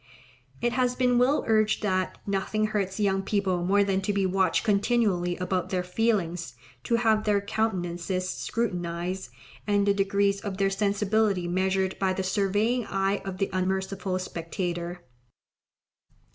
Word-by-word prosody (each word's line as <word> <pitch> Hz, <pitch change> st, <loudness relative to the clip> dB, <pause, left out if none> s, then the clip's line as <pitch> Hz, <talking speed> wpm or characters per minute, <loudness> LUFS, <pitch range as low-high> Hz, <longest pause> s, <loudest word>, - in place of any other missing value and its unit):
It 240 Hz, 0 st, +1 dB
has 250 Hz, 0 st, +1 dB
been 250 Hz, -1 st, +3 dB
well 265 Hz, +4 st, +3 dB
urged 215 Hz, -1 st, +2 dB
that 185 Hz, -2 st, 0 dB
"nothing 200 Hz, +2 st, 0 dB
hurts 200 Hz, -3 st, -2 dB
young 195 Hz, -2 st, +2 dB
people 195 Hz, -3 st, 0 dB
more 200 Hz, +3 st, +3 dB
than 195 Hz, -1 st, 0 dB
to 195 Hz, -, -1 dB
be 200 Hz, -1 st, +1 dB
watched 190 Hz, 0 st, +2 dB
continually 200 Hz, -5 st, +1 dB
about 180 Hz, 0 st, -1 dB
their 180 Hz, -1 st, -1 dB
feelings, 180 Hz, -4 st, -1 dB, 0.3 s
to 235 Hz, -, +2 dB
have 220 Hz, -2 st, +2 dB
their 205 Hz, -1 st, +2 dB
countenances 185 Hz, -3 st, -2 dB
scrutinized, 180 Hz, -, -3 dB, 0.4 s
and 205 Hz, -1 st, +2 dB
the 200 Hz, -, +4 dB
degrees 200 Hz, 0 st, +1 dB
of 200 Hz, -2 st, -4 dB
their 195 Hz, 0 st, +2 dB
sensibility 200 Hz, -1 st, +1 dB
measured 190 Hz, +1 st, 0 dB
by 190 Hz, -1 st, +1 dB
the 190 Hz, -, -2 dB
surveying 205 Hz, +5 st, +1 dB
eye 195 Hz, +1 st, 0 dB
of 190 Hz, -1 st, -5 dB
the 195 Hz, 0 st, -1 dB
unmerciful 190 Hz, 0 st, -1 dB
spectator. 175 Hz, 0 st, -4 dB
195 Hz, 145 wpm, -27 LUFS, 185-210 Hz, 0.4 s, the